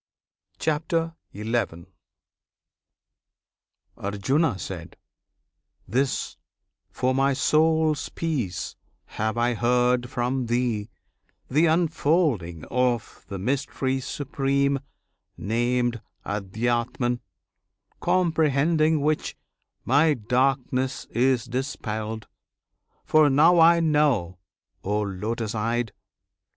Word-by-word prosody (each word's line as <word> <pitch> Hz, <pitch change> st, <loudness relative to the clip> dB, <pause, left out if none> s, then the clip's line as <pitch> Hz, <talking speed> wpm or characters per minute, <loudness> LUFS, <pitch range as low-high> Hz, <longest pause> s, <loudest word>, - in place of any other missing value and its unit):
CHAPTER 165 Hz, +1 st, -1 dB, 0.2 s
XI 105 Hz, -5 st, -2 dB, 2.1 s
Arjuna. 105 Hz, -, 0 dB, 1.3 s
This, 130 Hz, +6 st, -1 dB, 0.5 s
for 130 Hz, +1 st, 0 dB
my 135 Hz, +1 st, +2 dB
soul's 155 Hz, +2 st, +2 dB
peace, 140 Hz, -, -3 dB, 0.3 s
have 110 Hz, +2 st, -3 dB
I 120 Hz, +1 st, +2 dB
heard 125 Hz, +1 st, +2 dB
from 125 Hz, 0 st, -1 dB
Thee, 120 Hz, -3 st, 0 dB, 0.6 s
The 155 Hz, +5 st, +4 dB
unfolding 155 Hz, -, +1 dB
of 125 Hz, -2 st, -1 dB
the 100 Hz, -, -5 dB
Mystery 130 Hz, +4 st, -1 dB
Supreme 140 Hz, +1 st, 0 dB, 0.6 s
Named 120 Hz, +1 st, 0 dB, 0.2 s
Adhyatman; 120 Hz, +4 st, -1 dB, 0.8 s
comprehending 160 Hz, -2 st, +2 dB
which, 155 Hz, +1 st, -1 dB, 0.5 s
My 145 Hz, +4 st, +4 dB
darkness 130 Hz, +2 st, 0 dB
is 125 Hz, 0 st, +2 dB
dispelled; 110 Hz, -4 st, -4 dB, 0.8 s
for 155 Hz, -1 st, +5 dB
now 160 Hz, +6 st, +5 dB
I 170 Hz, +1 st, +7 dB
know 145 Hz, -, +1 dB, 0.4 s
O 105 Hz, +2 st, 0 dB
Lotus 105 Hz, +3 st, -3 dB
eyed! 115 Hz, +1 st, -1 dB
125 Hz, 75 wpm, -25 LUFS, 115-150 Hz, 2.1 s, I